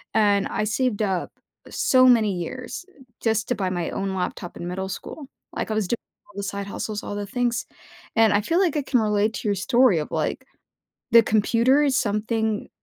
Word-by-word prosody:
and 205 -2 +3
I - - -2
saved 220 0 0
up 190 -4 -1 0.4
so 255 -1 +4
many 220 -5 +4
years, 255 - -6
uh, 265 - -16 0.2
just 220 -1 +1
to 245 - +1
buy 190 -2 -1
my 175 -2 -2
own 195 -1 -2
laptop 180 -1 -4
in 175 - -6
middle 190 +1 -3
school. 275 +8 -7 0.3
Like, - - -3
I - - +1
was 215 -4 0
doing 235 - +1 0.3
all 205 - -19
the 200 - -3
side 200 0 -4
hustles, 210 +1 -4
all 205 - -5
the 205 -1 -4
things, 240 -1 -1 0.5
and 225 -1 +5
I 205 - +4
feel 335 - +1
like 335 -6 +2
I - - +1
can 250 -3 +2
relate 210 0 +1
to - - -4
your 200 - +1
story 235 -1 +3
of, 150 - -4
like, - - -2 0.7
the 230 - +9
computer 235 +7 +3
is 275 -2 +2
something 215 0 -1
215 Hz, 205 wpm, -24 LUFS, 200-245 Hz, 0.7 s, the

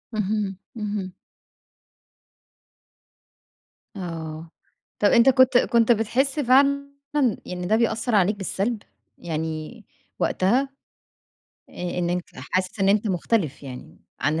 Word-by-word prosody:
اهم، 205 -2 -1 0.2
اهم. 205 -4 -3 2.8
آه. 165 -2 -6 0.5
طب 205 - +4
أنت 235 +4 +6
كنت 260 -1 +5
كنت 235 -1 +3
بتحِس 250 +6 +1
فعلًا 280 +1 +3 0.6
يعني 180 0 -5
ده 210 +5 +3
بيأثّر 225 0 +1
عليك 200 +1 +3
بالسَلب؟ 205 +3 -2 0.3
يعني 160 +6 -5 0.3
وقتها 245 +9 +2 1.0
آآ 180 0 -4
إن 175 -1 0
أنت 180 0 -1
حاسس 185 +2 -3
إن 195 - +3
أنت 210 +2 +3
مختلف 180 - 0
يعني 130 -2 -10 0.2
عن 155 +2 +1
205 Hz, 105 wpm, -24 LUFS, 180-235 Hz, 2.8 s, أنت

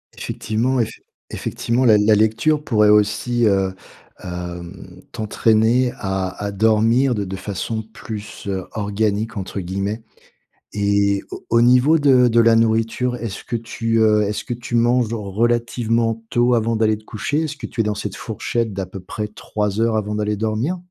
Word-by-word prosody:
Effectivement, 120 +5 -1
effe 115 -1 -2 0.3
effectivement, 120 +2 -2
la 110 -3 +6
la 105 +1 +4
lecture 115 +9 +2
pourrait 105 -6 +3
aussi, 110 +3 +2
heu, 95 -2 +2 0.5
hem, 90 +1 -8
t'entraîner 110 +3 +2
à 95 -1 -2
à 100 - -2
dormir 110 +5 +3
de 100 -2 -2
de 95 +1 -5
façon 105 +3 -4
plus, 110 -2 -9
heu, 95 -2 -3
«organique», 105 +1 -1
entre 95 +1 -4
guillemets, 100 +4 -3 0.7
et 100 -1 +1
au - - -8
au 115 0 +4
niveau 125 +6 +5
de 130 -4 +5
de 120 0 +3
la 115 0 +5
nourriture, 115 +2 +1
est-ce 115 -5 -6
que 120 - -4
tu, 115 0 -2
heu, 105 -1 +4
est-ce 105 +1 -2
que - - -4
tu 120 0 -5
manges 120 0 +2
relativement 115 +1 0
tôt 120 +1 +2
avant 115 -1 +1
d'aller 110 -1 +2
te 110 - -18
coucher? 120 +9 -2
Est-ce 155 -1 -5
que - - -7
tu 115 - -2
es - - +1
dans 105 -1 -1
cette 100 -1 -5
fourchette, 115 0 -3
d'à 95 0 -3
peu 95 +1 -9
près 105 +3 -5
3 105 0 -3
heures, 115 -1 +2
avant 105 0 -2
d'aller 105 0 -1
dormir? 110 - -1
110 Hz, 170 wpm, -20 LUFS, 105-120 Hz, 0.7 s, la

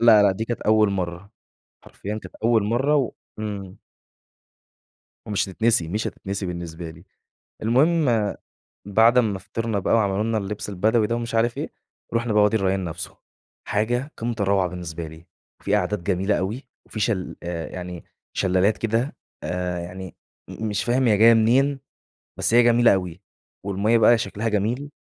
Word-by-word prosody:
لا، 115 -3 +7
لا 100 -2 +4
دي 110 +4 -3
كانت 120 +1 -4
أول 110 -1 +4
مرّة. 90 0 -4 0.5
حرفيًا 105 +2 -6
كانت - - -11
أول 115 -3 +4
مرّة 135 +7 +2
و 135 -5 0 0.3
إمم. 100 -3 -6 1.5
ومش 100 -2 -1
هتتنسي، 110 -4 +1
مش 105 +6 -2
هتتنسي 100 0 -5
بالنسبة 85 -1 -6
لي. 85 +2 -13 0.6
المهم 120 - +2 0.5
بعد 110 +4 +4
أمّا 105 -5 +2
فطرنا 105 +2 -3
بقى 95 - 0
وعملوا 100 -1 +1
لنا 115 0 0
اللبس 105 0 -4
البدوي 105 +3 +2
ده 115 - 0
ومش 115 -1 -3
عارف 115 +1 +1
إيه، - - -3 0.4
رُحنا 115 -1 0
بقى 105 0 +5
وادي 110 +2 +3
الريّان 95 -1 0
نفسه. 85 -1 -6 0.5
حاجة 120 +7 0
قمّة 115 0 -2
الروعة 100 -2 +2
بالنسبة 85 -2 -6
لي. 80 +2 -13 0.4
في 100 - +2
أعداد 105 -1 -1
جميلة 95 +2 +1
أوي 110 +9 -4 0.2
وفي 110 - -7
شل 100 -4 -1
آآ 85 -2 -4
يعني 90 -2 -7 0.3
شلالات 95 +3 +2
كده 115 +4 -1 0.3
آآ 90 -1 -2
يعني 90 +2 -8 0.3
م 110 - -4
مش 105 -1 -1
فاهم 125 +1 +2
هي 105 - +4
جاية 115 +3 +7
منين، 130 +5 +3 0.6
بس - - 0
هي 120 +1 +7
جميلة 120 -2 +5
أوي. 90 -1 -3 0.4
والمَيَّة 100 +4 +2
بقى 120 +1 +6
شكلها 110 +1 -2
جميل 115 +7 -1
105 Hz, 160 wpm, -23 LUFS, 95-115 Hz, 1.5 s, لا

